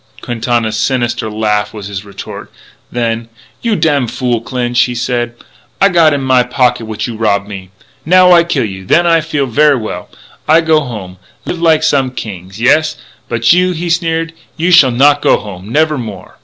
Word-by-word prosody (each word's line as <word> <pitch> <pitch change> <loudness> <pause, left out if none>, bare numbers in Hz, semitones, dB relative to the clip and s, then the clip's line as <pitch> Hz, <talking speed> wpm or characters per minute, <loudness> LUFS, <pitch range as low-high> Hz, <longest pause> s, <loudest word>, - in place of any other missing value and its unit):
Quintana's 115 -2 -1
sinister 120 -1 -1
laughter 105 0 -1
was 105 - -7
his 100 -1 -6
retort. 100 -1 -9 0.4
Then: 115 -1 -2 0.3
"You 230 -2 0
damfool 130 - 0
Clinch," 120 0 -2
he 125 - -5
said, 120 0 -2 0.4
"I 195 - +5
got 170 -4 +4
in 145 -1 -1
my 130 -1 +3
pocket 125 -1 0
what 110 -1 -4
you 120 - -5
rob 105 -2 +1
of - - -19
me. 95 -3 -9 0.3
Now 180 +2 +5
I 170 -1 +6
kill 155 -8 -1
you, 95 -2 -6
and 95 - -14
then 175 +2 +4
I 165 -1 +3
feel 150 -3 -2
ver' 145 +3 +3
well. 105 -6 -6 0.4
I 160 +2 +5
go 160 -1 +3
home, 100 -9 -8 0.3
live 175 - -4
like 160 -2 +3
some 135 -4 +2
kings; 100 -5 -8
yes. 155 +5 +2 0.3
But 115 +5 +3
you," 180 +1 +2
he 170 0 -3
sneered, 165 -1 -1 0.2
"you 170 +3 +1
shall 145 -6 +7
not 140 +4 +3
go - - +3
home 100 -1 -9
never 155 +1 +1
no - - -3
more. 95 -4 -10
125 Hz, 190 wpm, -13 LUFS, 110-155 Hz, 0.4 s, shall